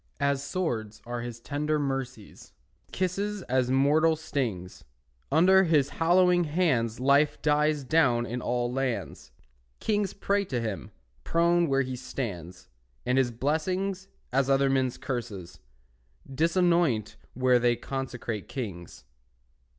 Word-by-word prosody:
As 140 -1 0
swords 120 - -3
are 120 0 -4
his 120 -1 -7
tender 150 +4 -1
mercies, 135 -6 -5 0.3
His - - -29
kisses 195 +3 -2
as 125 0 0
mortal 150 +5 +3
stings; 120 - -4 0.5
Under 190 +5 +5
his 150 -5 +3
hallowing 175 +3 +3
hands 140 -9 0
Life 140 +3 +3
dies 150 0 +2
down 130 -5 +2
in 120 +1 -4
all 120 0 -1
lands; 135 -2 -3 0.5
Kings 205 -2 0
pray 200 0 0
to 130 -9 -2
him, 105 - -4 0.3
prone 170 +1 +2
where 135 -1 +2
he 130 0 -5
stands, 100 -9 -6 0.4
And 125 +1 +2
his 130 -2 +2
blessings, 180 +10 -2 0.3
as 135 0 +2
other 135 0 +3
men's 130 -2 0
curses, 100 - -6 0.7
Disanoint 165 - +2 0.2
where 125 0 +3
they 120 0 +2
consecrate 120 -4 -5
kings. 95 - -7
135 Hz, 125 wpm, -27 LUFS, 120-160 Hz, 0.7 s, Under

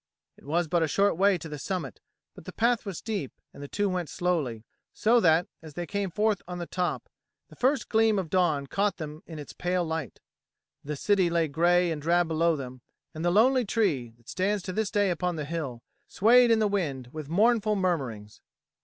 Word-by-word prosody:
It - - -20
was 165 +4 0
but 170 +2 +1
a 160 - +2
short 200 +6 +2
way 195 +2 +3
to 165 - -8
the 150 -2 -7
summit, 175 -6 -4 0.3
but - - -14
the - - -7
path 235 -1 +1
was 190 -4 -4
steep, 205 - -4 0.2
and - - -12
the 145 - -6
two 205 +7 -1
went 180 -5 -2
slowly, 155 - -1 0.3
so 235 +2 +4
that, 165 -3 +4 0.2
as 155 -3 -12
they 175 - -3
came 200 +1 -2
forth 210 +1 0
on 180 0 -5
the 175 - -4
top, 180 +1 -2 0.4
the - - -15
first 265 +2 +1
gleam 220 -1 +3
of 185 -5 -3
dawn 165 -7 +2
caught 200 +6 -1
them 155 -1 -7
in 160 - -8
its 150 - -9
pale 180 0 -1
light. 160 -7 -4 0.6
The 150 +1 -4
city 190 +3 +2
lay 170 -1 +1
grey 175 +3 +3
and 155 -2 -4
drab 170 +2 +2
below 165 +1 +2
them, 130 -3 -8 0.3
and 160 0 -6
the 175 - +2
lonely 245 +7 +4
tree, 165 - -1
that 120 - -29
stands 195 +1 -1
to 185 - -5
this 215 +1 -1
day 205 -3 +1
upon 180 0 -1
the 150 -2 -4
hill, 140 -7 -5 0.2
swayed 240 +4 +5
in 230 - +5
the 215 -1 +2
wind 145 -11 -2
with 155 -2 -7
mournful 215 +3 +3
murmurings. 135 - -2
175 Hz, 210 wpm, -27 LUFS, 155-205 Hz, 0.6 s, swayed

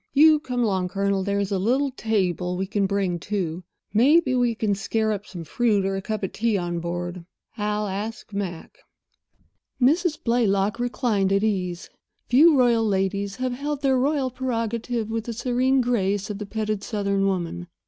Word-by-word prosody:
You 305 +1 +6
come 250 -5 -2
along, 190 -4 0
Colonel—there's 200 +1 -1
a 195 - +1
little 260 +8 +1
table 185 -7 -1
we 190 - -1
can 200 0 0
bring, 190 -3 -1
too. 180 -3 -3 0.3
Maybe 265 +5 +4
we 245 -2 +2
can 215 -2 0
scare 220 +3 -1
up 205 0 -4
some 175 -3 -7
fruit 205 +3 +1
or 195 0 -1
a 195 - -3
cup 215 +1 -4
of 190 - -2
tea 225 -2 0
on 175 -2 -2
board. 175 +1 -4 0.3
I'll 210 -1 -1
ask 210 +2 -5
Mac." 185 -5 -5 1.0
Mrs. 315 +5 +3
Blaylock 215 -2 +1
reclined 235 -5 0
at 200 +1 +2
ease. 180 -5 -1 0.4
Few 295 +5 +6
royal 240 -3 +4
ladies 195 0 -1
have 255 +1 -2
held 285 +2 -4
their 265 -2 +3
royal 270 -1 +1
prerogative 235 -2 -2
with 225 -1 -2
the 235 - -4
serene 255 +3 +1
grace 205 -4 0
of 205 - -6
the 210 - -5
petted 215 -1 -2
Southern 200 -2 0
woman. 175 -2 -2
210 Hz, 170 wpm, -24 LUFS, 195-245 Hz, 1.0 s, You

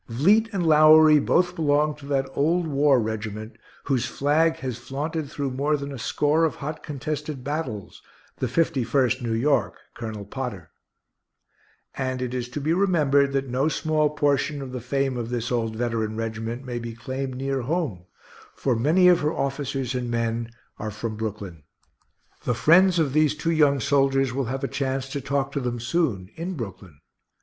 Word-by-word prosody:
Vliet 195 - +3
and 190 -5 -1
Lowery 155 0 +7
both 175 +4 +2
belong 150 -1 +2
to 140 -2 -12
that 135 -2 0
old 165 +5 +1
war 140 -3 +3
regiment 110 0 -4 0.3
whose 130 -3 0
flag 155 +5 +2
has 125 -3 -5
flaunted 145 +4 -4
through 140 -2 -3
more 145 +4 0
than 140 0 -6
a 135 - -7
score 150 +7 +1
of 160 - +1
hot 150 +2 -6
contested 150 -1 -5
battles, 135 - -4 0.4
the 130 - -1
Fifty 145 +1 +1
first 130 +2 +1
New 115 -2 -2
York, 120 -6 +1 0.2
Colonel 110 -3 -6
Potter; 105 - -6 1.2
and 130 -1 -2
it 125 -1 -3
is 125 -1 -3
to 135 - -4
be 155 +3 0
remembered 150 -7 +3
that 135 0 0
no 130 +4 0
small 155 -1 +1
portion 145 0 0
of 135 -2 -6
the 125 -1 -5
fame 135 +1 -1
of 115 -1 -4
this 120 0 -3
old 115 -2 -1
veteran 115 -2 -2
regiment 115 +3 -4
may 120 -2 -4
be 115 -1 -6
claimed 130 +2 -4
near 135 +1 -2
home, 130 - -2 0.5
for 130 -3 0
many 160 +10 +4
of 175 -1 +6
her 150 +1 0
officers 135 -3 -2
and 125 -1 -3
men 115 0 -1 0.3
are 110 - -3
from 110 +2 -5
Brooklyn. 105 -6 -5 0.8
The 125 - 0
friends 175 +8 +5
of 150 -5 +1
these 155 -1 +3
two 165 +2 -1
young 145 -4 +3
soldiers 135 -1 +2
will 135 0 -1
have 135 +4 -4
a - - +1
chance 135 -1 -2
to 140 +1 -4
talk 140 0 -1
to 140 - -2
them 120 -2 -3
soon 120 - -1
in 175 +3 -4
Brooklyn. 95 - -8
135 Hz, 175 wpm, -24 LUFS, 120-150 Hz, 1.2 s, Lowery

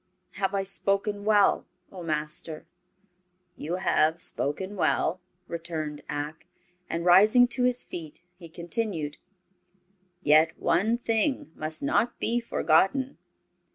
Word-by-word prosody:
Have 195 0 -2
I 195 - 0
spoken 200 +1 0
well, 210 -2 +3 0.2
O 185 - -9
Master?" 155 0 -4 0.9
"You 165 +4 -4
have 165 -3 +1
spoken 185 +9 +2
well," 180 -1 0 0.3
returned 160 -3 -5
Ak, 150 +2 -5 0.4
and 170 +1 -3
rising 215 +7 +6
to 250 0 +1
his 250 0 +1
feet 160 -4 -8 0.2
he 175 -2 -13
continued: 170 -3 -3 1.1
"Yet 155 +2 +4
one 205 +8 +1
thing 230 - -1
must 155 0 -2
not 225 +11 +1
be 240 +1 0
forgotten. 230 - +1
180 Hz, 115 wpm, -27 LUFS, 155-210 Hz, 1.1 s, rising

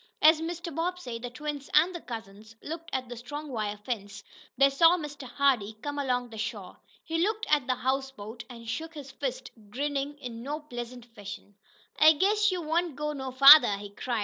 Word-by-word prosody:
As 315 +1 +7
Mr. 340 0 -5
Bobbsey, 330 -7 -3
the 245 +1 -6
twins 290 +2 -6
and 330 +5 +5
the 345 - -6
cousins 220 -2 -9
looked 330 +2 -6
at 255 -1 -2
the 245 - -7
strong 290 +6 -7
wire 215 -4 -3
fence, 205 -2 -6 0.3
they 275 0 +5
saw 330 +5 +5
Mr. 290 -4 -7
Hardee 245 -5 +1
come 290 0 -3
along 250 -3 -1
the 220 - -8
shore. 210 -4 -5 0.3
He 330 0 -2
looked 435 +4 0
at 290 -4 +3
the 255 - +1
houseboat, 255 -3 -3
and 230 -2 -11
shook 320 +8 -4
his 280 -3 -8
fist, 265 -1 -5 0.2
grinning 285 +3 -2
in 245 -5 -7
no 290 +5 -4
pleasant 245 -4 -8
fashion. 205 -3 -10 0.5
"I 310 +1 +8
guess 415 +6 +2
you 360 -2 -3
won't 330 0 0
go 300 +1 -3
no 265 -2 -5
farther!" 275 -4 +9
he 205 0 -8
cried. 235 +3 -3
270 Hz, 190 wpm, -28 LUFS, 235-305 Hz, 0.5 s, farther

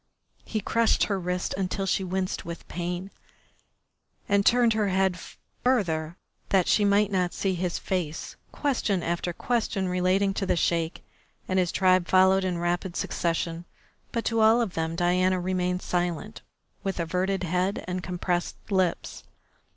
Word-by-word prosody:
He 215 - -2
crushed 230 +3 +2
her 200 -2 0
wrist 180 0 -2
until 195 +1 -2
she 190 0 +1
winced 185 0 -2
with 170 0 -8
pain, 180 +2 -4 1.2
and 200 0 +3
turned 235 +1 +4
her 215 -1 +1
head 190 0 +2
away 180 - -11 0.4
further 170 -10 +1 0.3
that 190 -3 +3
she 210 - +4
might 205 0 +3
not 180 -2 0
see 195 -1 0
his 180 -1 -2
face. 170 -5 -3 0.2
Question 225 - 0
after 175 +1 -1
question 215 -1 -1
relating 185 +2 +2
to 195 -1 -2
the - - +2
Sheik 170 0 0 0.4
and 185 0 +1
his 180 -2 +1
tribe 185 -1 +3
followed 190 +1 +5
in 180 -2 -1
rapid 175 +1 -1
succession, 165 0 -2 0.5
but 230 - -2
to 230 -1 +1
all 220 +2 +6
of 225 -7 -1
them 160 0 -2
Diana 180 +2 +2
remained 180 0 -1
silent, 175 +4 -2 0.4
with 195 -2 -2
averted 185 +3 -1
head 180 +3 -1
and 180 0 -2
compressed 175 0 -2 0.2
lips. 185 -3 0
185 Hz, 150 wpm, -27 LUFS, 175-195 Hz, 1.2 s, all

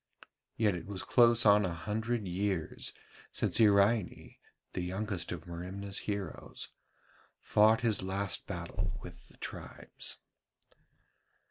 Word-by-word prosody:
Yet 105 -3 +3
it 85 - -6
was 100 -2 -4
close 120 -1 +5
on 105 0 +7
a 90 -3 -1
hundred 110 +4 -2
years 95 -2 -1 0.4
since - - +1
Iraine, 105 -2 +3 0.4
the 90 - -2
youngest 95 +1 -2
of 85 -1 -5
Merimna's 95 +3 -4
heroes, 100 -4 -5 0.7
fought 110 +2 +4
his 110 -4 +2
last 95 +1 -2
battle - - -4
with - - -11
the - - -19
tribes. - - -6
100 Hz, 115 wpm, -32 LUFS, 95-110 Hz, 0.7 s, on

